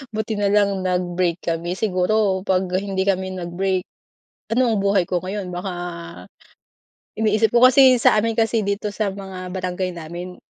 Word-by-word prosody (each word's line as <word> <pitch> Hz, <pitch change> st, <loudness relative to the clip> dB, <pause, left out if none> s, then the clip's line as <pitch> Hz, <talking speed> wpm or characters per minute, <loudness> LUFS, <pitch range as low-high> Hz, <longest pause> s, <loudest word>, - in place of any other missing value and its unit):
buti 220 Hz, 0 st, -2 dB
na 205 Hz, -1 st, 0 dB
lang 200 Hz, -2 st, +2 dB
nag-break 180 Hz, -1 st, 0 dB
kami 170 Hz, +2 st, -2 dB
siguro, 190 Hz, -1 st, +1 dB
'pag 190 Hz, -1 st, +1 dB
hindi 190 Hz, 0 st, -1 dB
kami 190 Hz, -1 st, 0 dB
nag-break, 180 Hz, +2 st, -1 dB, 0.7 s
ano 250 Hz, -2 st, +3 dB
ang 210 Hz, -, 0 dB
buhay 200 Hz, -2 st, +2 dB
ko 180 Hz, 0 st, -2 dB
ngayon? 185 Hz, 0 st, -5 dB
Baka 180 Hz, +2 st, -4 dB, 1.4 s
iniisip 220 Hz, 0 st, +1 dB
ko 240 Hz, -, +5 dB
kasi, 260 Hz, 0 st, +7 dB
sa -, -, +5 dB
amin 225 Hz, +1 st, 0 dB
kasi 225 Hz, -2 st, +1 dB
dito 200 Hz, +1 st, -2 dB
sa 205 Hz, -1 st, -2 dB
mga 190 Hz, -2 st, -8 dB
barangay 185 Hz, 0 st, -3 dB
namin, 175 Hz, +2 st, -7 dB
190 Hz, 155 wpm, -21 LUFS, 180-210 Hz, 1.4 s, kasi